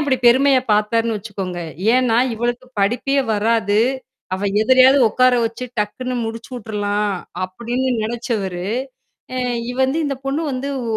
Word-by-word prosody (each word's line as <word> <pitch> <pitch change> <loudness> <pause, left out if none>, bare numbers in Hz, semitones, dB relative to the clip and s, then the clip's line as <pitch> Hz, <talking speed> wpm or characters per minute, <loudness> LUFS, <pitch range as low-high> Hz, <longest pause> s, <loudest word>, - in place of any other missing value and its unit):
அப்படி 285 -3 +1
பெருமையா 265 +2 +5
பாத்தார்ன்னு 225 +2 +1
வச்சுக்கோங்க? 190 -4 -5 0.3
ஏன்னா? 250 -2 +3 0.2
"இவளுக்குப் 240 +2 -4
படிப்பே 250 +7 +1 0.2
வராது. 215 -1 +1 0.6
அவ 190 - -5 0.2
எதிலயாவது 260 +3 +6
ஒக்கார 255 +3 +3
வச்சு, 230 +2 -6 0.2
டக்குன்னு 250 +5 -3
முடிச்சுவுட்ரலாம்" 210 -3 -3 0.3
அப்படின்னு 240 +7 -3
நெனைச்சவரு, 215 -6 -3 0.7
எ - - -1 0.3
இ - - -3
வந்து 265 +4 +1
இந்தப் 275 -2 -3
பொண்ணு 275 +4 -1
வந்து 265 +1 -3 0.3
ஒ - - +2
235 Hz, 125 wpm, -20 LUFS, 210-255 Hz, 0.7 s, எதிலயாவது